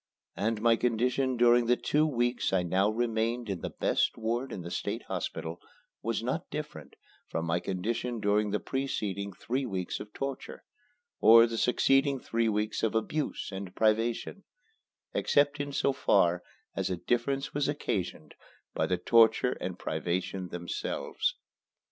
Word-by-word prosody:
And 110 Hz, +1 st, -1 dB
my 115 Hz, -1 st, +5 dB
condition 125 Hz, +2 st, +1 dB
during 120 Hz, 0 st, +5 dB
the 125 Hz, -, +5 dB
two 150 Hz, +5 st, +1 dB
weeks 120 Hz, -3 st, 0 dB
I 95 Hz, -2 st, +2 dB
now 95 Hz, +4 st, +2 dB
remained 115 Hz, 0 st, -1 dB
in 95 Hz, -, -4 dB
the -, -, -3 dB
best -, -, 0 dB
ward 120 Hz, +4 st, -2 dB
in 95 Hz, -, -5 dB
the 85 Hz, -, -7 dB
State -, -, -3 dB
Hospital 80 Hz, +2 st, -4 dB, 0.4 s
was 115 Hz, 0 st, -2 dB
not 130 Hz, +8 st, -2 dB
different 150 Hz, 0 st, -7 dB, 0.3 s
from 80 Hz, -, -2 dB
my 85 Hz, +1 st, +1 dB
condition 115 Hz, +7 st, -2 dB
during 105 Hz, 0 st, +2 dB
the 105 Hz, +1 st, 0 dB
preceding 100 Hz, -7 st, -3 dB
three 125 Hz, +8 st, -3 dB
weeks 95 Hz, -4 st, -3 dB
of 105 Hz, -, -9 dB
torture, 135 Hz, +2 st, -5 dB, 0.6 s
or 115 Hz, +1 st, +8 dB
the 115 Hz, -1 st, -3 dB
succeeding 135 Hz, +3 st, +3 dB
three 115 Hz, -1 st, 0 dB
weeks 105 Hz, 0 st, -1 dB
of 110 Hz, 0 st, 0 dB
abuse 145 Hz, +7 st, -1 dB
and 95 Hz, -1 st, -7 dB
privation, 115 Hz, -, +1 dB, 0.7 s
except 145 Hz, 0 st, +2 dB
in 145 Hz, 0 st, -3 dB
so 140 Hz, 0 st, +1 dB
far 90 Hz, -9 st, +3 dB, 0.3 s
as -, -, -1 dB
a 90 Hz, -, -1 dB
difference 130 Hz, +7 st, -1 dB
was 145 Hz, -1 st, 0 dB
occasioned 125 Hz, -, -3 dB, 0.4 s
by -, -, 0 dB
the 90 Hz, -, +1 dB
torture 115 Hz, +5 st, +4 dB
and 90 Hz, 0 st, -4 dB
privation 90 Hz, +3 st, -2 dB
themselves. 85 Hz, 0 st, -3 dB
115 Hz, 150 wpm, -30 LUFS, 100-125 Hz, 0.7 s, or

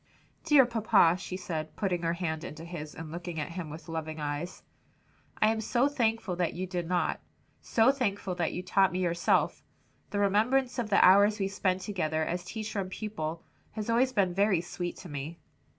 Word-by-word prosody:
"Dear 295 Hz, -5 st, +7 dB
papa," 220 Hz, -7 st, +4 dB
she 185 Hz, -1 st, -5 dB
said, 160 Hz, -4 st, -5 dB
putting 185 Hz, -4 st, -1 dB
her 165 Hz, 0 st, 0 dB
hand 160 Hz, -3 st, -3 dB
into 155 Hz, +2 st, -8 dB
his 155 Hz, -3 st, -7 dB
and 160 Hz, -1 st, -7 dB
looking 170 Hz, -1 st, -5 dB
at 150 Hz, -, -4 dB
him 170 Hz, -2 st, -5 dB
with 155 Hz, +1 st, -9 dB
loving 160 Hz, -1 st, -4 dB
eyes, 150 Hz, +4 st, -4 dB, 0.8 s
"I 215 Hz, -, +5 dB
am 220 Hz, 0 st, -1 dB
so 240 Hz, +4 st, +2 dB
thankful 225 Hz, -8 st, 0 dB
to -, -, -1 dB
you -, -, +4 dB
that -, -, -4 dB
you 185 Hz, -, -2 dB
did 175 Hz, -2 st, -3 dB
not; 180 Hz, 0 st, 0 dB, 0.4 s
so 230 Hz, +3 st, +4 dB
thankful 205 Hz, -8 st, -2 dB
that 175 Hz, -2 st, -1 dB
you 180 Hz, -, -4 dB
taught 190 Hz, +1 st, +3 dB
me 180 Hz, -, -3 dB
yourself. 175 Hz, 0 st, +1 dB, 0.5 s
The 205 Hz, -, -3 dB
remembrance 245 Hz, +6 st, +2 dB
of 230 Hz, -3 st, -2 dB
the 200 Hz, -, +6 dB
hours 200 Hz, +3 st, +6 dB
we 195 Hz, -2 st, 0 dB
spent 190 Hz, -1 st, 0 dB
together 160 Hz, -6 st, -1 dB
as 175 Hz, +2 st, -3 dB
teacher 215 Hz, +1 st, -4 dB
and 185 Hz, -1 st, -3 dB
pupil, 170 Hz, -6 st, -4 dB, 0.3 s
has 215 Hz, +1 st, -3 dB
always 250 Hz, +3 st, +3 dB
been 195 Hz, -7 st, +1 dB
very 195 Hz, -1 st, +3 dB
sweet 175 Hz, +1 st, -4 dB
to 185 Hz, -, -10 dB
me." 145 Hz, +2 st, -6 dB
185 Hz, 200 wpm, -29 LUFS, 165-215 Hz, 0.8 s, Dear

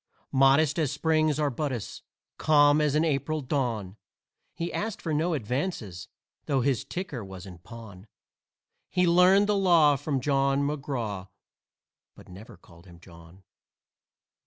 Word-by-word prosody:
Modest 135 Hz, +4 st, +3 dB
as 150 Hz, -5 st, 0 dB
Spring's 155 Hz, 0 st, +1 dB
arbutus, 140 Hz, -5 st, -3 dB, 0.4 s
calm 145 Hz, -1 st, +4 dB
as 150 Hz, -1 st, +1 dB
an 155 Hz, +2 st, +2 dB
April 155 Hz, +1 st, -1 dB
dawn, 120 Hz, -8 st, -3 dB, 0.6 s
He 170 Hz, +1 st, -4 dB
asked 220 Hz, 0 st, -3 dB
for 160 Hz, -, -4 dB
no 160 Hz, +3 st, 0 dB
advances 125 Hz, -, -4 dB, 0.4 s
though 135 Hz, -3 st, +1 dB
his 130 Hz, -3 st, 0 dB
ticker 160 Hz, -, -6 dB
was 95 Hz, -1 st, -10 dB
in 90 Hz, -3 st, -11 dB
pawn; 105 Hz, -1 st, -12 dB, 0.8 s
He 180 Hz, -1 st, +1 dB
learned 180 Hz, +3 st, +5 dB
the 210 Hz, 0 st, +1 dB
law 170 Hz, -7 st, +4 dB
from 145 Hz, -1 st, -2 dB
Jawn 135 Hz, +1 st, +1 dB
McGraw 130 Hz, -10 st, -4 dB, 0.9 s
but -, -, -16 dB
never 95 Hz, +1 st, -12 dB
called 85 Hz, +1 st, -19 dB
him 85 Hz, -1 st, -15 dB
"Jawn." 85 Hz, +1 st, -17 dB
140 Hz, 135 wpm, -27 LUFS, 110-155 Hz, 0.9 s, learned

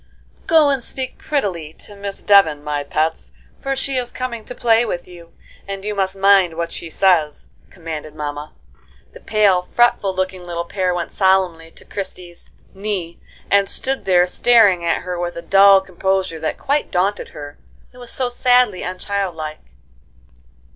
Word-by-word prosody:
"Go 315 Hz, -3 st, +5 dB
and 270 Hz, -2 st, -1 dB
speak 260 Hz, +2 st, -4 dB
prettily 180 Hz, -, -2 dB
to 205 Hz, -, -12 dB
Miss 200 Hz, 0 st, -7 dB
Devon, 160 Hz, -8 st, +4 dB
my 150 Hz, -1 st, -2 dB
pets, 155 Hz, +3 st, -2 dB, 0.3 s
for 275 Hz, 0 st, -2 dB
she 270 Hz, 0 st, -3 dB
is 245 Hz, -1 st, -2 dB
coming 240 Hz, -3 st, -5 dB
to 250 Hz, -, -8 dB
play 230 Hz, 0 st, +3 dB
with 175 Hz, -7 st, -4 dB
you, 170 Hz, -2 st, -14 dB, 0.4 s
and 195 Hz, 0 st, -6 dB
you 210 Hz, -, -2 dB
must 190 Hz, -1 st, -1 dB
mind 195 Hz, -3 st, +4 dB
what 170 Hz, 0 st, -3 dB
she 170 Hz, -, -7 dB
says," 165 Hz, -5 st, +1 dB, 0.2 s
commanded 155 Hz, -3 st, -8 dB
mamma. 145 Hz, 0 st, -5 dB, 0.6 s
The -, -, -12 dB
pale, 195 Hz, -4 st, +2 dB
fretful 220 Hz, -5 st, +3 dB
looking 185 Hz, -1 st, -3 dB
little 170 Hz, -1 st, -4 dB
pair 180 Hz, 0 st, -1 dB
went 175 Hz, -1 st, -4 dB
solemnly 185 Hz, -4 st, +1 dB
to -, -, -16 dB
Christie's 180 Hz, -3 st, -7 dB, 0.2 s
knee, 190 Hz, -4 st, -4 dB, 0.3 s
and 200 Hz, -1 st, +4 dB
stood 265 Hz, -5 st, -1 dB
there 180 Hz, -2 st, +4 dB
staring 200 Hz, -2 st, +4 dB
at 170 Hz, -, 0 dB
her 180 Hz, -1 st, -4 dB
with 175 Hz, 0 st, -3 dB
a 170 Hz, -, -6 dB
dull 195 Hz, 0 st, +6 dB
composure 190 Hz, -2 st, -2 dB
that 155 Hz, -, -3 dB
quite 285 Hz, +2 st, -1 dB
daunted 195 Hz, +3 st, -1 dB
her, 145 Hz, -1 st, -10 dB, 0.3 s
it 250 Hz, -, -15 dB
was 245 Hz, -1 st, -8 dB
so 255 Hz, -, -1 dB
sadly 245 Hz, -5 st, +2 dB
unchildlike. 180 Hz, -4 st, -4 dB
190 Hz, 160 wpm, -19 LUFS, 170-210 Hz, 0.6 s, dull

